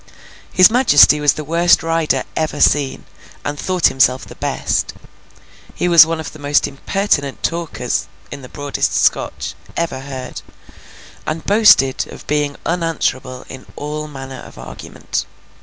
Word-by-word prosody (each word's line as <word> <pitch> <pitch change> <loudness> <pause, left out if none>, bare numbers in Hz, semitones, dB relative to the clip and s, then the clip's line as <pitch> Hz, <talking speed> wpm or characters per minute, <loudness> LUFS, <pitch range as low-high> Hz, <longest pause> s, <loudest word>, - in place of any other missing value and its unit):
His 185 +2 +6
majesty 185 - +5
was 145 -1 +3
the 155 - -6
worst 170 +3 +3
rider 165 -1 0
ever 155 -2 -2
seen, 145 -2 +2 0.4
and 145 0 -4
thought 185 -2 -1
himself 130 0 +3
the - - -12
best. - - -2 0.8
He - - -1
was 170 -2 +8
one 165 0 -2
of 160 - -6
the 155 - -12
most 145 0 +1
impertinent 140 -1 -2
talkers 165 -7 -2 0.2
(in 140 - -8
the 125 - -12
broadest 145 -1 -2
Scotch) - - 0 0.2
ever 165 -6 -2
heard, 135 -1 -7 0.9
and 155 +1 -4
boasted 200 -11 +4
of - - -12
being 145 -1 -1
unanswerable 160 -7 -2
in 130 -1 -11
all 150 +1 -5
manner 135 -2 -9
of - - -13
argument. 65 0 -6
150 Hz, 140 wpm, -18 LUFS, 135-165 Hz, 0.9 s, was